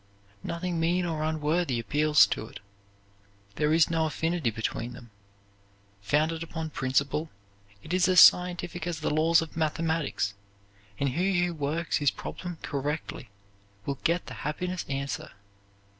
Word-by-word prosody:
Nothing 170 0 -3
mean 175 +2 +1
or 160 -3 -2
unworthy 155 -3 0
appeals 150 -1 +4
to 110 +2 -4
it. - - -11 1.0
There 150 0 +2
is 160 +1 +4
no 160 -1 +1
affinity 160 -3 -1
between 115 +2 -3
them. 120 -2 -13 0.9
Founded 155 +9 +1
upon 160 -1 -5
principle, 140 +3 0 0.5
it 165 - -5
is 185 -1 +3
as 185 -1 +6
scientific 175 -1 +5
as 165 -3 -3
the - - 0
laws 165 +2 +4
of 160 - -11
mathematics, 160 -9 -1 0.7
and 140 - +1
he 175 +5 +1
who 175 - -3
works 155 +2 -1
his 145 -2 +3
problem 175 +5 -7
correctly 145 -3 -4 0.6
will 140 -1 -3
get 170 +1 +1
the - - -8
happiness 180 +4 -3
answer. 140 0 -4
160 Hz, 140 wpm, -28 LUFS, 140-170 Hz, 1.0 s, as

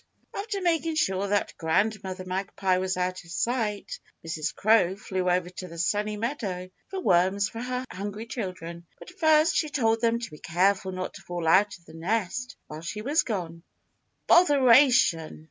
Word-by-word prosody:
After 400 -1 -3
making 330 -2 +1
sure 195 -9 +1
that 205 0 0
Grandmother 190 +2 -1
Magpie 185 0 -1
was 185 0 -1
out 185 0 -2
of 165 - -17
sight, 230 - -2 0.3
Mrs. 160 -2 -2
Crow 200 -4 +3
flew 185 -2 -2
over 180 0 +1
to 180 0 -7
the 170 -1 -10
Sunny 210 +5 0
Meadow 205 -7 -4 0.2
for 385 -1 -4
worms 190 - +3
for 230 - -7
her 250 +1 -3
hungry 205 +3 -5
children, 175 -7 -6
but - - -12
first 315 -2 +3
she 310 - +1
told 225 -5 +1
them 230 0 +2
to 235 -3 -6
be 150 - -11
careful 190 +2 +1
not 185 0 -5
to - - -11
fall 175 -2 -4
out 195 +5 +4
of 170 - -28
the 160 - -14
nest 205 +7 -2
while 155 +1 -9
she 210 +6 -5
was 290 +6 +2
gone. 170 -7 -4 0.7
"Botheration!" 260 - +5
200 Hz, 170 wpm, -27 LUFS, 180-240 Hz, 0.7 s, Botheration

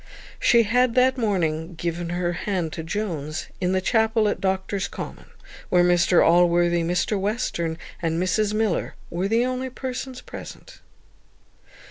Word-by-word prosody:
She 235 -1 +5
had 245 +2 +2
that 260 +1 +4
morning 175 -8 -1
given 170 +1 -3
her 175 0 -1
hand 175 -3 -2
to 165 - -4
Jones, 160 -4 -4
in 180 0 +1
the 190 0 +1
chapel 220 +1 +2
at - - -3
Doctors' 190 +1 -1
Commons, - - -8 0.4
where 180 -1 +4
Mr 175 0 +4
Allworthy, 175 0 +4
Mr 180 +4 0
Western, 190 -6 -2 0.2
and 165 -1 0
Mrs 205 +3 +1
Miller, 215 -4 -1 0.2
were 180 +3 -1
the 230 +4 +2
only 255 +1 -2
persons 255 0 -5
present. - - -10
185 Hz, 140 wpm, -24 LUFS, 170-225 Hz, 0.4 s, She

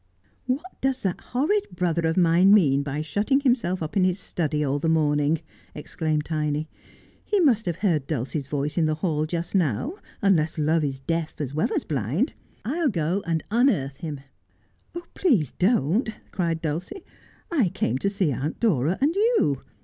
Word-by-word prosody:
'What 295 +9 -3
does 265 0 0
that 190 -3 -1
horrid 320 +12 0
brother 170 -2 0
of 160 - -1
mine 180 +3 +6
mean 140 -9 +4
by 145 +1 -3
shutting 215 - +1
himself 230 - +1
up 155 - -6
in 195 - +3
his 185 0 +2
study 155 -5 -2
all 140 0 0
the 165 - 0
morning 150 -2 +2
1 160 - -8 0.2
' - - -31
exclaimed 155 0 -2
Tiny. 150 -1 -1 0.3
' - - -28
He 415 - +1
must 235 - +3
have 170 - 0
heard 165 -8 0
Dulcie's 140 0 -3
voice 145 +2 -2
in 160 - +3
the 155 - 0
hall 155 -2 -1
just 170 +1 -4
now, 180 - +1 0.3
unless 170 -6 +2
love 155 +1 +2
is 135 -2 -2
deaf 165 +2 -3
as 140 -3 -3
well 155 - +1
as - - 0
blind! 145 - -1 0.3
I'll 305 +5 +1
go 175 -1 0
and 165 -1 0
unearth 210 - +2
him.' 150 -4 -6 0.5
' 345 0 -12
Please 215 - +2
don't,' 200 - +1 0.2
cried 165 -2 -1
Dulcie; 170 - -4 0.3
' - - -32
I 265 - +2
came 130 -5 -1
to 200 - +1
see 195 -6 0
Aunt 135 +4 -3
Dora 175 - +2
and 295 +4 +3
you. 400 - +2
165 Hz, 185 wpm, -25 LUFS, 150-210 Hz, 0.5 s, mine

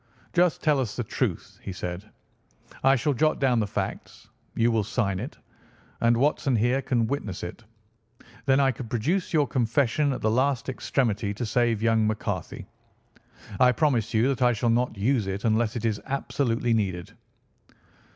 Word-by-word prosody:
"Just 175 -1 +2
tell 150 -3 +3
us 120 -5 -2
the 120 - -2
truth," - - -3
he - - -6
said. 90 +3 -6 0.7
"I 135 +1 +5
shall 140 +3 0
jot 155 +4 +1
down 125 -3 +2
the 105 - 0
facts. - - -5 0.3
You 115 +1 +3
will 110 -2 +1
sign 100 -3 -1
it, 125 +9 -7 0.6
and 115 0 +3
Watson 140 0 +1
here 120 +5 +2
can 120 -4 +1
witness 110 -7 -4
it. 90 +7 -7 0.8
Then 135 0 +4
I 135 -1 +4
could 120 -2 -8
produce 160 - -1
your 150 -3 +3
confession 135 +3 +1
at 130 - -4
the 110 - +1
last 130 +1 +1
extremity 110 -6 -1
to 120 - -3
save 115 -2 +1
young 115 -1 +3
McCarthy. 110 0 -3 0.9
I 125 -1 +6
promise 120 -4 +1
you 115 +2 +3
that 135 -1 -2
I 125 -1 +4
shall 115 +1 +1
not 120 -1 0
use 110 0 +1
it 95 +2 -3
unless 110 +1 +1
it 115 - -3
is 110 -2 -1
absolutely 120 -3 0
needed." 95 -6 -2
120 Hz, 170 wpm, -26 LUFS, 110-135 Hz, 0.9 s, I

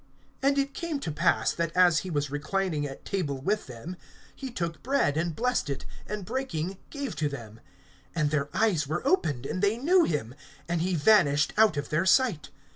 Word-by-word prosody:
(30)And 275 +1 +3
it 275 0 0
came 330 -3 -3
to 165 - -4
pass, 165 +4 +2
that 170 -1 -1
as 175 -3 +6
he 185 - -6
was 145 -4 -1
reclining 155 0 -1
at 135 - -10
table 150 -9 -2
with 200 +8 -1
them, 130 +9 -8 0.4
he 270 - -6
took 170 -8 -4
bread, 260 - +1
and 165 0 -1
blessed 245 -8 0
it, 140 -1 -4 0.2
and 210 -3 -4
breaking, 195 -7 -3
gave 280 -2 -5
to 150 -1 0
them. 115 -6 -9 0.6
(31)And 150 -3 +2
their 145 -1 0
eyes 190 -10 +1
were 155 - -3
opened, 150 - +1
and 185 - -3
they 205 +2 +2
knew 345 +8 +4
him; 130 - -2 0.3
and 170 -1 0
he 180 +1 0
vanished 145 -4 +4
out 215 -7 +4
of 145 - -3
their 160 +4 +1
sight. 200 - +3
175 Hz, 195 wpm, -28 LUFS, 145-220 Hz, 0.6 s, as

